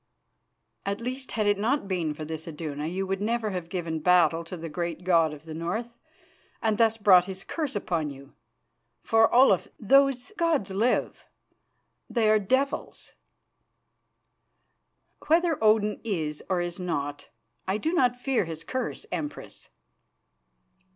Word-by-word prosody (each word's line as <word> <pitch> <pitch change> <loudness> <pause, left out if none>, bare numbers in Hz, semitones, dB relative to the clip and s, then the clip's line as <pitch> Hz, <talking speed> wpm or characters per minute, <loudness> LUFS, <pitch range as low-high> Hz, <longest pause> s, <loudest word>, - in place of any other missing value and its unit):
"At 200 +1 -2
least, 255 +3 -5
had 215 -2 0
it 205 -1 +2
not 235 +1 0
been 170 -5 -1
for 155 - -6
this 160 +1 -6
Iduna 150 -2 -5
you 190 +3 -2
would 195 +1 -2
never 225 0 -1
have 180 -3 -5
given 170 -3 -3
battle 170 0 +4
to 180 +2 -7
the 165 0 -6
great 170 +2 -4
god 165 -3 +3
of 150 +1 -11
the 160 - -7
North 220 +9 -4 0.6
and 220 -2 0
thus 225 -1 +4
brought 190 -4 +6
his 190 0 -6
curse 300 -7 -3
upon 170 -6 -1
you. 140 0 -12 0.7
For, 225 0 +4
Olaf, 240 -7 +5
those 275 - +3
gods 315 - +1
live; 220 +6 0 0.8
they 230 -3 +1
are 215 - +5
devils." 260 +8 -1 2.1
"Whether 330 -4 +2
Odin 215 -1 +3
is 160 -9 -3
or 185 -2 +1
is 175 +1 -4
not, 145 -5 -3 0.4
I 190 +2 +1
do 320 +9 -1
not 250 -8 +3
fear 250 -4 0
his 165 -1 -6
curse, 260 0 -4
Empress." 295 -1 -6
195 Hz, 145 wpm, -27 LUFS, 165-235 Hz, 2.1 s, brought